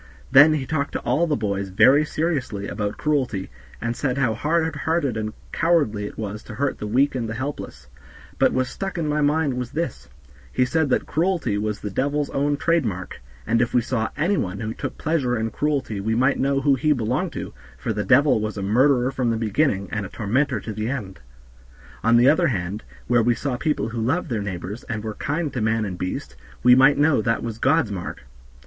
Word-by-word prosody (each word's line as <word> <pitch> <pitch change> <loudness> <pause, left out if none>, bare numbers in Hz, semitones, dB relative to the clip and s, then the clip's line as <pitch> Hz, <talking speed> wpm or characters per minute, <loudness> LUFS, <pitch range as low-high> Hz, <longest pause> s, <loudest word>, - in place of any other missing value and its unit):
Then 145 +4 +8
he 145 -4 -1
talked 140 +1 -2
to - - -1
all 170 +3 +1
the 150 - +1
boys 100 -4 -2
very 130 +10 +5
seriously 145 -11 -2
about 105 -1 -3
cruelty, 130 - -1 0.3
and 115 0 -2
said 135 -1 -1
how 130 -5 +2
hard 160 +6 0
hearted 155 -6 0
and 110 0 -3 0.2
cowardly 145 -12 +1
it - - -11
was 105 -1 -5
to 110 - -8
hurt 140 +4 -1
the 105 - -4
weak 130 +7 +2
and 115 -4 -3
the 110 - -4
helpless; 130 - -6 0.5
but - - +4
what 130 0 +1
stuck 195 +8 -5
in 165 -2 -1
my 150 0 0
mind 145 -1 +2
was 125 -1 -4
this, 155 - -4 0.4
he 130 - +2
said 160 +2 +1
that - - +1
cruelty 165 - 0
was 105 0 -2
the 105 - -4
devil's 145 +7 -1
own 145 +1 0
trade 165 +1 +2
mark, 95 - -5 0.2
and 115 +1 +2
if 120 0 0
we 120 - +5
saw 115 -2 -1
any 180 +7 +1
one 95 +1 -2
who 110 0 -3
took - - -6
pleasure 140 -7 0
in 110 0 -2
cruelty 140 -8 -1
we 110 +3 -1
might 130 +4 +2
know 135 0 +1
who 140 0 +4
he 150 +3 +2
belonged 115 -5 -1
to, - - -6 0.2
for 110 - -2
the 105 0 -2
devil 130 -2 +4
was 105 0 -3
a 100 - -3
murderer 125 +5 +3
from 130 -3 -1
the 115 - 0
beginning, 110 -2 0
and 105 -2 -2
a 95 - -6
tormentor 120 +8 0
to 110 - -6
the 110 +2 -3
end. 105 -9 -5 0.8
On 115 +1 +5
the 120 +2 +5
other 170 +4 +4
hand, 100 - -3 0.2
where 120 -1 +3
we 120 +1 +2
saw 135 +2 -2
people 150 -2 -1
who 115 0 -4
loved 130 +7 -1
their 110 -3 -1
neighbors, 100 +2 -5
and 105 -4 -4
were 110 -1 -4
kind 150 +4 -2
to 125 - -2
man 110 0 +1
and 95 -3 -4
beast, 90 -7 -4 0.3
we 125 +1 +8
might 135 +3 +6
know 145 -4 +3
that 115 +1 0
was 115 -1 -5
God's 140 -4 +2
mark." 90 -3 -6
125 Hz, 220 wpm, -23 LUFS, 110-145 Hz, 0.8 s, Then